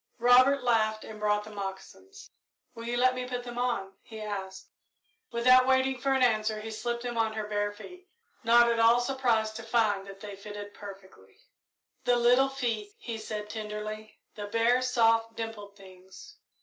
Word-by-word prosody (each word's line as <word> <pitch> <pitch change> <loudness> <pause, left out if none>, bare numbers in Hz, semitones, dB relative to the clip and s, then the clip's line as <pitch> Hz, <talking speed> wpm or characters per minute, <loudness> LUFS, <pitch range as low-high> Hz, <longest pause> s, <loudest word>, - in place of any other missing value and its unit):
Robert 250 +3 +5
laughed 220 -3 +1
and 215 -1 -10
brought 210 0 +1
the 215 - -11
moccasins. 205 - -9 0.4
"Will 230 0 -8
you 240 0 -1
let 255 +1 +4
me 250 0 -4
put 245 -1 -4
them 240 0 -6
on?" 215 -6 -1
he 220 -1 -11
asked. 200 -3 -6 0.6
Without 255 +2 +5
waiting 260 0 +2
for 275 - +1
an 265 -1 +2
answer 215 -2 +1
he 220 +1 -7
slipped 235 +2 -3
them 240 -1 -3
on 220 -1 +1
her 215 -1 -3
bare 205 0 -1
feet, 360 - -13 0.3
not 235 +1 +6
at 230 - 0
all 230 +1 +5
surprised 240 -4 0
to - - -6
find 220 -4 0
that 195 0 -11
they 205 0 -8
fitted 205 0 -9
perfectly. 190 - -13 0.7
"The 245 - +4
little 245 +3 +4
feet," 230 -6 -3
he 230 -2 -6
said, 215 -1 -5
tenderly; 215 0 -6 0.2
"the 205 -1 -7
bare, 230 +4 +2
soft, 230 -2 +2
dimpled 215 -3 -7
things!" 190 - -15
225 Hz, 175 wpm, -29 LUFS, 210-245 Hz, 0.7 s, not